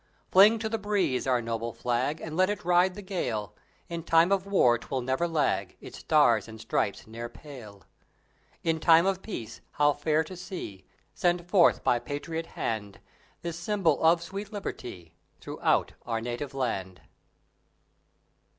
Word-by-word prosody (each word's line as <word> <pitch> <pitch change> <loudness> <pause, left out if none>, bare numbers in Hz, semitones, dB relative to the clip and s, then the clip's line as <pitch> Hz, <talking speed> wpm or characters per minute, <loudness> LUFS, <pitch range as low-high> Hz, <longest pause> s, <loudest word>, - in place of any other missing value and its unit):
Fling 205 +4 +7
to 220 0 -3
the 225 0 -2
breeze 200 -12 0
our 125 -2 +2
noble 115 0 -3
Flag, 125 +5 -1
And 160 -1 -6
let 185 +2 +3
it 205 -4 -4
ride 180 +1 +3
the 205 - -8
gale! 125 - -3 0.3
In 170 -1 -4
time 165 +2 +4
of 195 0 +1
War 125 -12 +4
'twill 130 +1 -3
never 130 +7 0
lag; 160 -3 -1
Its - - -10
stars 120 -9 +3
and 110 0 -10
stripes 100 -2 -1
ne'er 115 +2 -7
pale! 115 -8 -12 0.8
In 165 -1 +1
time 165 +1 +6
of 190 -1 0
Peace 120 - -7
how 145 0 +3
fair 155 +2 +1
to 185 +4 -9
see 175 - -8 0.3
Sent 175 -1 0
forth 175 -2 +4
by 120 - +3
patriot 155 +6 -5
hand 105 -3 -3 0.4
This 170 -1 -4
symbol 175 -5 +1
of 165 +1 +4
sweet 195 +4 -7
Liberty 95 - -7 0.3
Throughout - - 0
our 115 -1 -1
native 120 +4 -5
land! 95 -8 -3
155 Hz, 155 wpm, -28 LUFS, 120-180 Hz, 0.8 s, Fling